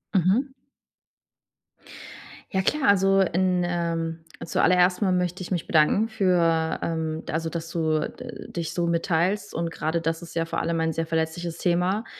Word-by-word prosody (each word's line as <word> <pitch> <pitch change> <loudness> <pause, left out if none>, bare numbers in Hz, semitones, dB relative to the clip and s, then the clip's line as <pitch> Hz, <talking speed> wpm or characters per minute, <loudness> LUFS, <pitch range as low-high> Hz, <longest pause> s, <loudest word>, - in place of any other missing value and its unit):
Mhm. 195 - +3 2.0
Ja 190 - +1
klar, 285 +8 +1
also 195 0 +4
in, 180 0 +1
ähm 165 -2 -2 0.2
zu - - 0
aller 185 - +5
erst 180 +2 +3
mal 195 -3 +2
möchte 180 0 -1
ich 180 - -9
mich 175 -3 -2
bedanken 160 +7 +3
für 175 -6 +1
ähm, 160 -1 -2
also 160 +1 -1
dass 165 0 -5
du, 160 -2 +1
äh, 240 +10 -6
dich 170 -2 -4
so 175 -1 0
mitteilst 175 +4 0
und 170 0 -2
grade 160 +1 -2
das 165 0 -2
ist 170 -1 -10
ja 165 -1 0
vor 165 - -2
allem 165 0 -1
ein 160 0 0
sehr 165 +1 -2
verletzliches 160 +1 -2
Thema, 180 +6 +1
170 Hz, 165 wpm, -25 LUFS, 165-185 Hz, 2.0 s, aller